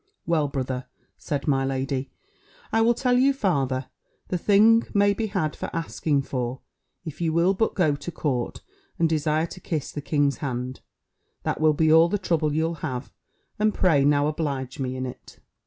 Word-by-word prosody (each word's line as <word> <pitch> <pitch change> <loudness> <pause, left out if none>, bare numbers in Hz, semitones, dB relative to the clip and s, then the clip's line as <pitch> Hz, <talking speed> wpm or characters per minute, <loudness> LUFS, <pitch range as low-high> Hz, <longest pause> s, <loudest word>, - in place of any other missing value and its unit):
"Well, 160 -3 +2
brother," 130 -2 -3 0.3
said 140 -2 -4
my 135 -2 +2
lady, 135 0 -2 0.6
"I 225 - +4
will 235 +1 +4
tell 250 0 +2
you 275 +2 +4
farther, 135 - 0 0.4
the 180 - 0
thing 215 +4 +5
may 205 0 +4
be 220 +2 -2
had 185 -7 -1
for - - -5
asking 155 -3 -1
for; 125 -1 -3 0.4
if 160 0 -7
you 165 -1 +1
will 170 +4 +3
but 220 +3 0
go 155 -7 +2
to 145 +5 -7
court, 135 -6 -2 0.4
and 165 - +3
desire 155 0 +1
to 175 - -9
kiss 160 -5 -3
the 145 - -5
king's 145 -3 +1
hand, 130 -1 -4 0.6
that - - -2
will 155 -1 +5
be 155 +1 +3
all 165 +1 +6
the 205 - +1
trouble 165 -5 0
you'll 160 +2 0
have: 130 -4 -4 0.5
and 215 0 +2
pray 160 -7 +3
now 145 0 +3
oblige 145 -4 -3
me 130 -1 -2
in 130 0 -3
it." 125 - -10
155 Hz, 180 wpm, -25 LUFS, 135-175 Hz, 0.6 s, all